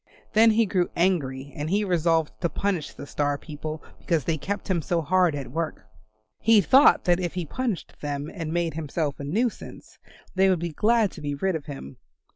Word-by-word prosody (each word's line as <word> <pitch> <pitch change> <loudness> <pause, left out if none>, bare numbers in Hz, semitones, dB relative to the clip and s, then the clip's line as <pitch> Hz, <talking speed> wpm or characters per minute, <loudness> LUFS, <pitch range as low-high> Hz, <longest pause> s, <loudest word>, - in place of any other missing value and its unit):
Then 225 +1 +6
he 225 +1 +3
grew 185 -3 0
angry 140 -7 0
and 150 +1 -3
he 205 +3 +2
resolved 165 - +1
to 170 - +1
punish 190 -6 -2
the - - -9
Star 145 0 -1
people 155 0 -7 0.2
because 165 -5 0
they 165 - 0
kept 190 +7 -4
him 185 -4 +1
so 170 +3 0
hard 180 0 +3
at 140 -3 -6
work. 160 -5 -3 0.5
He 225 -1 +5
thought 270 +8 +6
that 175 0 +3
if 175 -1 -3
he 180 -2 -2
punished 235 - -3
them 145 0 -3
and 165 -5 -5
made 170 -1 0
himself 155 -2 -3
a - - -5
nuisance, 215 - -3 0.3
they 190 0 +4
would 185 - +3
be 170 +1 -3
glad 220 +2 +2
to 160 - -11
be 145 -1 -3
rid 190 +5 0
of 155 - -5
him. 135 - -8
170 Hz, 200 wpm, -25 LUFS, 150-190 Hz, 0.5 s, Then